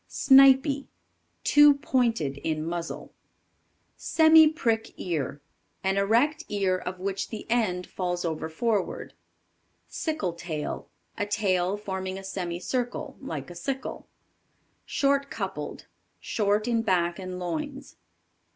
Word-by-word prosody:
Snipy. 275 +1 +5 0.6
Too 295 0 +7
pointed 230 - 0
in 155 0 -2
muzzle. 170 0 -5 0.8
Semi 320 -1 +6
prick 235 -8 -1
Ear. 145 -5 -3 0.4
An 190 +1 +1
erect 240 +11 +2
ear 195 -3 +1
of 180 +1 -5
which 195 +1 -3
the 220 - -7
end 185 -7 +1
falls 175 -1 -3
over 160 -1 -3
forward. 205 +4 -2 0.7
Sickle 255 - -2
tail. 165 -3 -5 0.3
A 205 - 0
tail 195 -2 +1
forming 190 -2 -4
a 195 - -8
semicircle, 195 +9 -3
like 160 - -6
a - - -10
sickle. 265 +10 -5 0.8
Short 280 -1 +1
coupled. - - -5 0.3
Short 210 +1 0
in 230 -1 +2
back 175 -5 +1
and 185 -1 -6
loins. 270 - -5
200 Hz, 115 wpm, -27 LUFS, 175-265 Hz, 0.8 s, Too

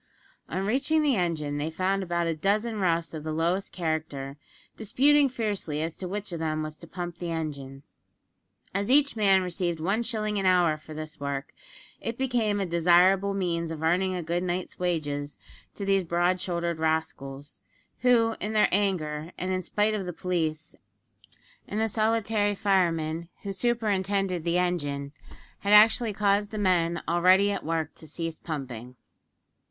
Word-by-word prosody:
On 190 +3 -2
reaching 275 +8 +2
the 285 -4 +3
engine, 160 -6 -1
they 150 +2 -1
found 190 +4 0
about 175 -2 -1
a 165 -1 0
dozen 210 +6 0
roughs 170 -3 0
of 155 -2 -6
the 155 - -3
lowest 170 +5 0
character, 155 -5 -3 0.4
disputing 280 +6 +3
fiercely 205 - -2
as 165 0 -4
to 185 - -5
which 205 +1 -4
of 170 - -4
them 155 -1 -1
was 155 0 -5
to 170 - -12
pump 175 -1 -6
the 175 - -4
engine! 140 -4 -5 0.9
As 200 +3 -1
each 285 -1 +4
man 195 -3 +4
received 175 -2 -2
one 195 +8 0
shilling 215 -3 -2
an 195 - +1
hour 175 -4 +4
for 155 0 -11
this 155 0 -7
work, 140 -1 -4 0.5
it 230 0 -4
became 235 -6 0
a 195 - 0
desirable 180 +3 +4
means 170 -3 -1
of 160 -1 -5
earning 185 +3 +2
a 180 - -3
good 170 +2 -1
night's 180 0 -3
wages 150 -5 -2 0.4
to 200 - -5
these 195 -1 +2
broad 175 +2 +1
shouldered 170 -2 -2
rascals; 145 -7 -3 0.4
who, 230 -2 +3
in 210 +1 -3
their 215 - +4
anger, 170 -5 0
and 185 +1 -2
in 185 0 0
spite 210 +4 0
of 195 -4 -3
the 180 - -4
police, 160 -3 -2 0.9
and 210 - -3
the 225 - +2
solitary 215 -1 +1
fireman 170 -5 +1
who 200 - -3
superintended 195 -4 0
the 170 +1 +1
engine, 145 -6 -1 0.5
had 200 +1 +1
actually 220 +2 +6
caused 205 0 +1
the 215 - -6
men 175 -4 +1
already 185 +4 +4
at - - -3
work 160 -1 -2
to 160 - -13
cease 165 0 -5
pumping. 125 -6 -6
180 Hz, 165 wpm, -27 LUFS, 160-205 Hz, 0.9 s, actually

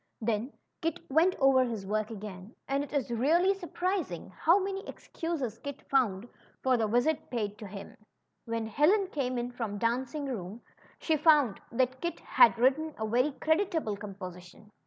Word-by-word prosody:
Then 225 +3 -1 0.3
Kit 330 -1 -1
went 335 +6 +4
over 270 -1 +5
his 225 -5 -4
work 215 +2 -1
again, 205 -1 -8
and 275 +1 0
it 290 - -9
is 275 -5 -1
really 325 - +3
sur 385 -3 -8
prising 350 - -2
how 330 - +4
many 390 0 -2
excuses 280 -10 -4
Kit 285 -1 -7
found 235 -6 +2 0.4
for 260 -1 +4
the 225 -2 +1
visit 245 +8 +1
paid 210 -4 -3
him. 200 -1 -8 0.5
When 230 -1 -2
Helen 350 - +3
came 255 -4 -1
in 240 +1 -2
from 225 -4 -4
dancing 255 +7 -1
school, 220 -4 -5 0.4
she 320 - +1
found 295 -8 +4
that 255 +1 0
Kit 340 0 -3
had 485 - +5
written 280 +6 +2
a 220 - -2
very 250 +6 +2
creditable 320 - 0
composition. 195 0 -10
255 Hz, 160 wpm, -30 LUFS, 215-310 Hz, 0.5 s, over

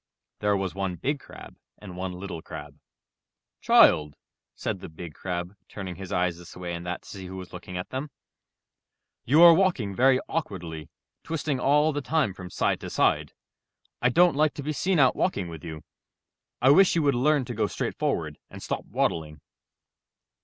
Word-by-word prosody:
There 105 -1 +2
was 95 -2 -2
one 95 -2 -2
Big 140 - -2
Crab - - -13 0.2
and 95 -4 -10
one 90 0 -4
Little 90 -2 -6
Crab. 75 -1 -9 0.8
^'Child, 75 -1 +5 0.4
said 105 -4 -3
the - - -9
Big 80 0 -9
Crab, 90 +2 -4
turning 95 -4 -6
his 95 -1 -8
eyes 90 -1 0
this 90 0 -12
way 90 -1 -5
and 85 0 -5
that 90 - -4
to - - -17
see 95 -2 -8
who 95 +1 -7
was 95 -1 -9
looking 90 0 -7
at 90 - -6
them, 135 +3 -4 1.2
''you 150 +7 +6
are 170 -1 +11
walking 165 - +1
very 130 +4 +4
awkwardly, 85 - -4 0.3
twisting 150 -4 -2
all 150 +4 +3
the 145 - -2
time 145 -7 0
from 90 -1 -9
side - - 0
to - - -7
side. - - +1 0.7
I 125 - +4
don't 170 +3 +4
like 155 +1 +2
to 145 - -6
be 155 +2 -2
seen 185 +4 +1
out 130 -4 +5
walking 100 - -1
with 80 -2 -9
you. 80 -2 -7 0.8
I 130 - +7
wish 190 +5 +6
you 165 - +2
would 140 -1 +3
learn 140 +2 +2
to 120 - -5
go 110 -2 0
straight - - -3
forward - - -1
and - - -10
stop - - -3
waddling." 75 -2 -1
100 Hz, 185 wpm, -26 LUFS, 90-145 Hz, 1.2 s, are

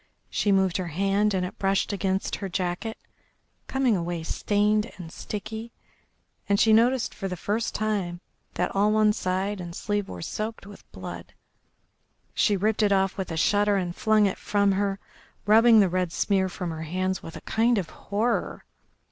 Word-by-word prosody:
She 205 - +1
moved 190 -2 +3
her 185 -2 -3
hand 195 +5 +1
and 180 -1 0
it 180 - -8
brushed 195 +1 +1
against 190 -1 -1
her 195 -1 -5
jacket, 185 +5 -3 0.7
coming 265 -4 +2
away 170 -2 -3
stained 210 +5 +1
and 170 -3 -9
sticky, 220 +4 -6 0.8
and 200 0 +3
she 220 - +5
noticed 240 +2 +3
for 195 - -4
the 180 -1 -4
first 215 +6 -2
time 200 -5 -1 0.4
that 180 - -1
all 205 +2 +3
one 215 -1 +4
side 190 +1 -2
and 170 -1 -7
sleeve 205 -1 -2
were 90 -2 -7
soaked 215 - -4
with 205 0 -14
blood. - - -8 1.0
She 205 -2 +2
ripped 215 +3 +1
it 210 -1 +3
off 195 -1 +2
with 190 -3 -4
a 165 - -3
shudder 205 +4 +3
and 180 -3 -2
flung 215 -1 +3
it 195 - -1
from 200 -1 +2
her, 195 0 0 0.5
rubbing 225 +1 +7
the 195 - +4
red 180 -1 -1
smear 190 +1 +1
from 180 -1 -4
her 160 -1 -6
hands 185 +3 -2
with 165 - -9
a - - -8
kind 230 +1 +2
of 185 -5 -3
horror. 215 +4 -2
200 Hz, 175 wpm, -26 LUFS, 185-215 Hz, 1.0 s, rubbing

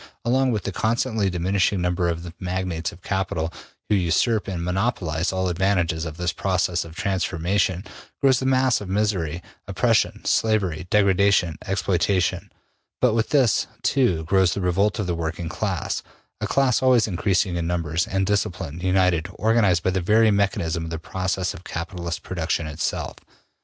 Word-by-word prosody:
Along 130 +2 +2
with 110 -3 -1
the 100 - -3
constantly 110 0 0
diminishing 95 +2 +1
number 90 0 0
of 85 0 -3
the 85 -1 -8
magnates 90 -2 -2
of 90 - -16
capital, 85 -4 -2 0.3
who - - +1
usurp 100 +4 +2
and 90 -3 -3
monopolize 90 -4 -1
all 95 0 -1
advantages 90 -2 0
of 80 -1 -6
this 90 -2 -1
process 90 -2 0
of 80 -1 -12
transformation, 95 0 0 0.4
grows 130 -2 +4
the 130 - -1
mass 130 -2 +3
of 100 - -7
misery, 95 -5 -1 0.2
oppression, - - +1
slavery, 95 -6 +1
degradation, 100 -4 +3
exploitation; 95 -1 0 0.5
but 125 -3 +3
with 115 0 0
this, 130 -8 +3 0.2
too, 95 - +2
grows 95 +1 +2
the 100 - -2
revolt 100 +3 +1
of 105 - -1
the 90 - -1
working 80 0 -3
class, - - -2 0.4
a - - -2
class 135 -3 +2
always 125 -4 +4
increasing 95 -1 0
in 85 -1 -2
numbers, 85 -1 -1
and 95 0 0
disciplined, 90 -5 -2
united, 90 -3 +2
organized 105 -5 +2
by 95 - +2
the 95 0 -1
very 110 +4 +4
mechanism 85 -5 0
of 80 - -5
the 80 - -3
process 95 +2 -2
of 85 - -11
capitalist 85 0 -5
production 85 -2 -2
itself. 75 -1 -3
95 Hz, 160 wpm, -23 LUFS, 85-105 Hz, 0.5 s, grows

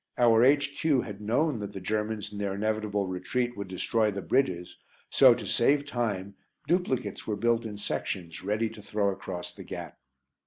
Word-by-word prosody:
Our 115 -2 +6
H.Q. 140 +1 +3
had 105 -2 -8
known 125 +5 +1
that 100 -1 -5
the 95 - -5
Germans 105 +2 -2
in 100 - -6
their 100 -1 -1
inevitable 105 -1 0
retreat 110 +7 -2
would 100 -1 -5
destroy 105 +4 +1
the 100 -2 -4
bridges, 90 -10 0 0.4
so, - - +7
to - - -6
save 145 0 +3
time, 105 -8 -2 0.3
duplicates 135 - 0
were 105 - 0
built 115 +1 +2
in 105 -1 -7
sections, 90 -4 -4
ready 105 +3 0
to 110 - -11
throw 105 -1 0
across 90 -2 -6
the - - -10
gap. - - -7
105 Hz, 170 wpm, -28 LUFS, 100-120 Hz, 0.4 s, so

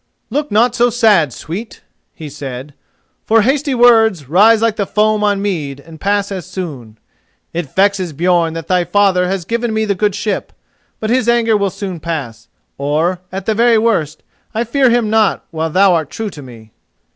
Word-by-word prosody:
"Look 295 +4 -1
not 230 +4 +3
so 245 0 +2
sad, 215 - +3
sweet," 195 - -8 0.3
he 160 - -8
said, 140 -1 -8 0.5
"for 225 -1 +3
hasty 275 +3 0
words 225 - +4
rise 210 - +5
like 225 -1 +1
the 200 -3 -2
foam 215 0 +1
on 205 -1 +1
mead 150 -9 -3
and 160 +2 -14
pass 200 0 0
as 185 -4 -5
soon. 135 - -7 0.6
It 165 -5 -5
vexes 195 -3 +1
Björn 170 +1 +1
that 165 -1 -6
thy 180 -1 +2
father 180 0 +2
has 190 -2 -3
given 235 +2 -2
me 220 0 +1
the 205 - 0
good 205 +1 0
ship: 205 -1 -3 0.5
but 220 0 -2
his 240 -2 +1
anger 230 -2 +3
will 200 -1 +1
soon 190 -2 -6
pass, 140 -9 -5 0.3
or, 155 +6 0
at 190 0 -5
the 220 - +1
very 230 +1 +3
worst, 195 -10 0 0.3
I 225 - +1
fear 260 +2 +2
him 235 -2 +1
not 220 -2 +1
while 160 0 -2
thou 185 +3 +4
art 160 -4 -1
true 220 -2 -5
to 150 - -10
me." 115 -4 -13
195 Hz, 185 wpm, -16 LUFS, 160-220 Hz, 0.6 s, rise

